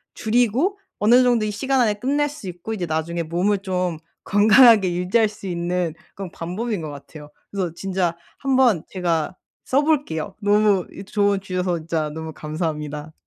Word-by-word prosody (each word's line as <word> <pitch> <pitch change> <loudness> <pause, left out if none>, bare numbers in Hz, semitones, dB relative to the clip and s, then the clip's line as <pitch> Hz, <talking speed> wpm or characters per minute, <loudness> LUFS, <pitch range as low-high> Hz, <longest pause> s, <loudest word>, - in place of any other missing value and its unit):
줄이고 245 - +1 0.2
어느 240 +5 +5
정도 240 -3 +2
이 210 - -2
시간 265 +6 0
안에 215 -3 +3
끝낼 285 +6 0
수 275 -9 -10
있고 180 +6 -6
이제 185 -5 -3
나중에 165 +2 -2
몸을 185 +5 0
좀 180 -4 -2 0.3
건강하게 210 -2 +6
유지할 190 +6 +2
수 205 -2 -10
있는 175 -1 -1 0.2
그런 195 -3 -7
방법인 195 +3 -4
것 155 - -5
같아요. 145 +1 -11 0.2
그래서 185 -4 -2
진짜 185 -2 -1 0.2
한번 260 - +3
제가 175 -2 -1 0.3
써 275 +3 +2
볼게요. 260 - -1
너무 205 -2 +3
이 195 - -9
조언 200 -1 +1
주셔서 185 -2 -1
진짜 160 -1 -2
너무 160 +1 -7
감사합니다. 150 -1 -4
190 Hz, 335 characters per minute, -22 LUFS, 170-220 Hz, 0.3 s, 건강하게